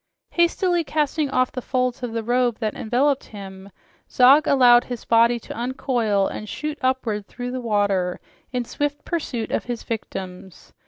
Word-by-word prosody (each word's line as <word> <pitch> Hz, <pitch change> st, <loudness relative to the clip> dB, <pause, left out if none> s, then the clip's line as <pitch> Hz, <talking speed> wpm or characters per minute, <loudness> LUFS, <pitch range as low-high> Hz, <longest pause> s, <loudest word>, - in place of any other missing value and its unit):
Hastily 345 Hz, 0 st, +2 dB
casting 300 Hz, 0 st, 0 dB
off 255 Hz, -1 st, +1 dB
the 255 Hz, -, -5 dB
folds 255 Hz, 0 st, -1 dB
of 245 Hz, -2 st, -4 dB
the 230 Hz, 0 st, -3 dB
robe 245 Hz, 0 st, +1 dB
that 215 Hz, -3 st, -2 dB
enveloped 265 Hz, +5 st, 0 dB
him, 195 Hz, -2 st, -10 dB, 0.4 s
Zog 270 Hz, +4 st, +6 dB
allowed 245 Hz, -3 st, +6 dB
his 245 Hz, -2 st, -6 dB
body 235 Hz, +1 st, +4 dB
to -, -, -9 dB
uncoil 235 Hz, -4 st, 0 dB
and 215 Hz, +2 st, -5 dB
shoot 300 Hz, 0 st, -4 dB
upward 245 Hz, -6 st, -1 dB
through 245 Hz, 0 st, -6 dB
the 255 Hz, 0 st, -4 dB
water 200 Hz, -5 st, 0 dB, 0.3 s
in 250 Hz, -2 st, -2 dB
swift 290 Hz, +3 st, -3 dB
pursuit 280 Hz, -9 st, -3 dB
of -, -, -1 dB
his 240 Hz, -2 st, -5 dB
victims. 190 Hz, -5 st, -7 dB
245 Hz, 160 wpm, -23 LUFS, 215-270 Hz, 0.4 s, Zog